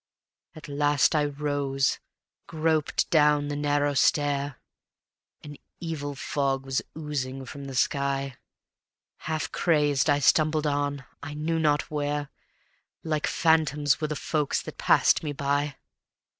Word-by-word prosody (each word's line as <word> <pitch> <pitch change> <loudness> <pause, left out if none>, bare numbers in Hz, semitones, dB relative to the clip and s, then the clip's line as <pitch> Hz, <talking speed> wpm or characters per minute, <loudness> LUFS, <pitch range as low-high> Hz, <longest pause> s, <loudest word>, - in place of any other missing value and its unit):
At 155 +1 -10
last 145 0 +2
I 150 -2 +2
rose, 140 -2 -1 0.5
groped 160 -1 0
down 150 -2 +4
the 145 - -2
narrow 145 0 +1
stair; 145 -1 +1 0.8
An 145 -1 -9 0.2
evil 145 -4 -4
fog 135 -1 -1
was 135 0 -1 0.2
oozing 135 -4 -4
from 140 +1 -8
the 135 -1 -7
sky; 140 0 0 0.9
Half 155 0 -2
crazed 150 -3 +2
I 145 - +4
stumbled 155 +2 +3
on, 145 -1 -1 0.2
I 150 +1 -7
knew 165 +2 -1
not 150 -2 +1
where, 145 -1 -2 0.7
Like 155 -2 -1
phantoms 150 -3 +2
were 155 - 0
the 150 - -3
folks 150 -1 -1
that - - -9
passed - - +4
me 150 -2 -3
by. 145 0 -1
145 Hz, 130 wpm, -26 LUFS, 140-150 Hz, 0.9 s, down